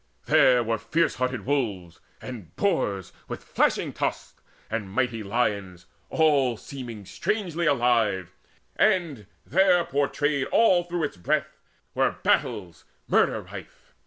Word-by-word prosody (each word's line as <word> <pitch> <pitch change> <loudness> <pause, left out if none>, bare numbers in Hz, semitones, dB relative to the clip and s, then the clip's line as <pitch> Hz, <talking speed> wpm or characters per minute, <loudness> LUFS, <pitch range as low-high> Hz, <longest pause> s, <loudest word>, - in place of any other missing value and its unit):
There 125 -2 +5
were 115 -1 -1
fierce 165 +7 +1
hearted 125 -1 -2
wolves, 105 -11 -2 0.2
And 115 -10 -9
boars 100 - -1
with - - -6
flashing - - 0
tusks, - - -4 0.3
and 110 -3 -4
mighty 120 +1 -1
lions 100 -4 -2 0.2
All 140 -7 +3
seeming 120 -6 -8
strangely 175 - -2
alive; 115 - +2 0.4
and, 155 - +1 0.2
there 180 +2 +4
portrayed 145 0 0
Through - - +2
all 175 -6 +3
its 145 - -3
breadth, 85 - -1 0.3
were - - +2
battles 85 -4 0 0.2
murder - - +2
rife. - - -12
125 Hz, 120 wpm, -26 LUFS, 105-155 Hz, 0.4 s, There